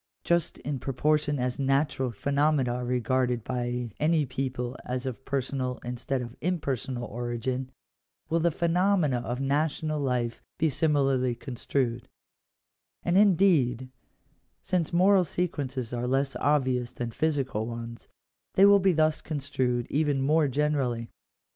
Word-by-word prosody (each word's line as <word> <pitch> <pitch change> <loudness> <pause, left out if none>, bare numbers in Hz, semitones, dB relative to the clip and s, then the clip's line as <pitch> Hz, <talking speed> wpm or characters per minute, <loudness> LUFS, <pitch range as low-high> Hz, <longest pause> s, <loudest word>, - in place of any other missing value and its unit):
Just 170 -1 +1
in 140 0 -4
proportion 145 +3 +1
as 125 0 -2
natural 135 -1 +1
phenomena 140 +2 +1
are 125 0 -3
regarded 125 -1 0
by 125 -1 -3
any 155 0 +2
people 130 -1 -3
as 125 +1 -3
of 130 0 -5
personal 130 -2 -2
instead 125 +1 -2
of 120 0 -9
impersonal 135 -7 -2
origin, 120 +2 -3 0.6
will 165 - +1
the 170 +1 +3
phenomena 170 -3 +2
of 120 +1 -4
national 150 +2 0
life 125 -4 -1 0.2
be 160 0 +2
similarly 135 -4 +1
construed: 125 0 -2 1.0
and, 175 - +1
indeed, 165 - +4 0.7
since 175 -4 0
moral 185 +2 +5
sequences 140 -8 -3
are 120 0 -2
less 135 +2 0
obvious 130 -4 +1
than 120 -1 -4
physical 135 -6 -1
ones, 115 0 -7 0.5
they 195 - +7
will 200 0 +7
be 190 -1 +3
thus 155 -1 +2
construed 130 -5 -1
even 145 -1 +1
more 150 +3 +3
generally. 135 -4 0
135 Hz, 130 wpm, -28 LUFS, 125-155 Hz, 1.0 s, they